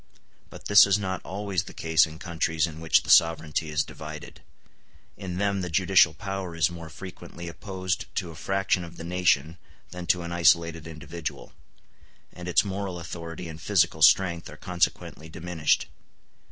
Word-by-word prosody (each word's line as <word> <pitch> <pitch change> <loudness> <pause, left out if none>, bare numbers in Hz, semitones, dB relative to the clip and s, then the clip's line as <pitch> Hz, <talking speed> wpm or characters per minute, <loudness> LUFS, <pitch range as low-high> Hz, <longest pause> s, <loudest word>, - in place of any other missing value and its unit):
But - - -12
this 100 0 +8
is 100 - +3
not 95 -3 -3
always 100 -2 -3
the - - -11
case 80 0 +3
in 80 0 -10
countries 80 -2 -1
in 80 -2 -8
which 80 0 +3
the - - -9
sovereignty 80 -1 +3
is 75 -1 +1
divided; 75 -1 -10 0.7
in 90 -3 -6
them 100 0 0
the 90 - -3
judicial 90 0 +4
power 95 -1 -5
is 80 0 +2
more 85 -2 -9
frequently 85 0 -9
opposed 95 +1 -4
to 85 - -2
a - - -12
fraction 95 +2 0
of 85 0 -11
the - - -7
nation 85 -2 +1 0.3
than 90 -1 -7
to 90 0 +2
an 85 - -6
isolated 85 -1 +2
individual, 80 +1 -7 0.8
and 90 0 -9
its 90 - +3
moral 95 -2 -4
authority 85 0 -7
and 80 0 -9
physical - - +2
strength 85 -3 +4
are - - -11
consequently 85 -2 -2
diminished. 80 -1 0
85 Hz, 165 wpm, -26 LUFS, 80-95 Hz, 0.8 s, this